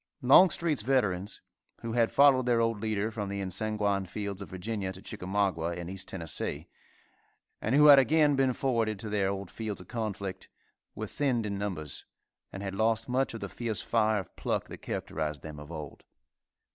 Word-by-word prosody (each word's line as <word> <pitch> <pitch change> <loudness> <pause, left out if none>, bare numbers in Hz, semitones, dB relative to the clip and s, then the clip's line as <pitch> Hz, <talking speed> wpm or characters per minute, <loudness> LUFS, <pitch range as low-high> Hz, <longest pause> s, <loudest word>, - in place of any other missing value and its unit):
Longstreet's 155 - +5
veterans, 105 -6 0 0.4
who 115 - -4
had 115 -1 +3
followed 135 -3 +5
their 120 -1 +3
old 115 -2 0
leader 110 0 -1
from 105 -3 -4
the 100 0 -3
ensanguined 100 0 -1
fields 100 -1 -4
of 100 - -7
Virginia 95 +1 -3
to 95 - -10
Chicamauga 95 -4 -2
and 85 +1 -6
East 95 0 -7
Tennessee, 80 -2 -4 0.9
and - - +1
who 150 +1 +7
had 145 -2 +10
again 150 +1 +4
been 135 -1 +2
forwarded 115 -5 0
to 105 +2 -5
their 100 -2 +1
old 100 -1 -4
fields 110 -3 -5
of 90 - -12
conflict, 100 -5 -4 0.5
were 110 - -4
thinned 125 -1 0
in 100 - -2
numbers, 85 -9 -4 0.5
and 95 - -7
had 95 -1 -4
lost 110 +2 +1
much 130 -1 0
of 115 - -7
the 100 - -3
fierce 115 +1 -3
fire 110 0 +2
of 95 - -6
pluck - - -2
that - - -7
characterised 75 -2 -4
them 75 -2 -8
of 75 +2 -10
old. 75 -4 -8
105 Hz, 180 wpm, -29 LUFS, 95-115 Hz, 0.9 s, had